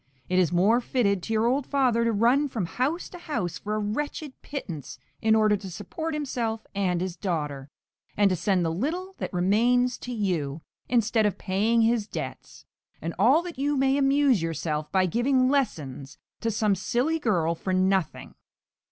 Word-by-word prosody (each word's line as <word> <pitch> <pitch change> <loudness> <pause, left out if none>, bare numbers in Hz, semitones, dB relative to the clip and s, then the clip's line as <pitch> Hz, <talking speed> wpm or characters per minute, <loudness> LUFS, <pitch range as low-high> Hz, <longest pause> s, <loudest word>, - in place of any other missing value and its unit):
It 185 0 +3
is 175 -3 +2
more 200 +8 +3
fitted 200 -7 +1
to 225 - -4
your 220 +1 +2
old 260 +3 +1
father 255 -5 +2
to 230 - +2
run 240 +7 +3
from 225 -8 -3
house 270 - -2
to 355 - -10
house 235 - -3
for 210 +1 -3
a - - -1
wretched 280 +7 -3
pittance 170 - -6 0.2
in 220 0 +4
order 215 -1 +4
to 195 -1 -7
support 255 - -5
himself 235 -6 -3
and 185 -3 0
his 185 -2 -3
daughter, 150 -8 -3 0.5
and 205 -1 +5
to - - +2
send 180 0 +1
the 165 - 0
little 330 - -3
that - - -4
remains 235 +7 +2
to 250 - -7
you, 170 - -2 0.3
instead 225 -2 +3
of 205 - -3
paying 215 +4 +1
his 225 -2 +2
debts; - - -7 0.3
and 165 - -4
all 265 - +5
that 345 -6 -8
you 290 +1 +1
may 270 0 +3
amuse 275 - +3
yourself 155 -2 -3
by 190 -1 +3
giving 255 +6 +2
lessons 150 - -2 0.2
to 230 - -1
some 215 -1 +1
silly 245 - 0
girl 175 - +1
for 185 +3 -4
nothing! 185 -2 0
220 Hz, 180 wpm, -26 LUFS, 185-255 Hz, 0.5 s, and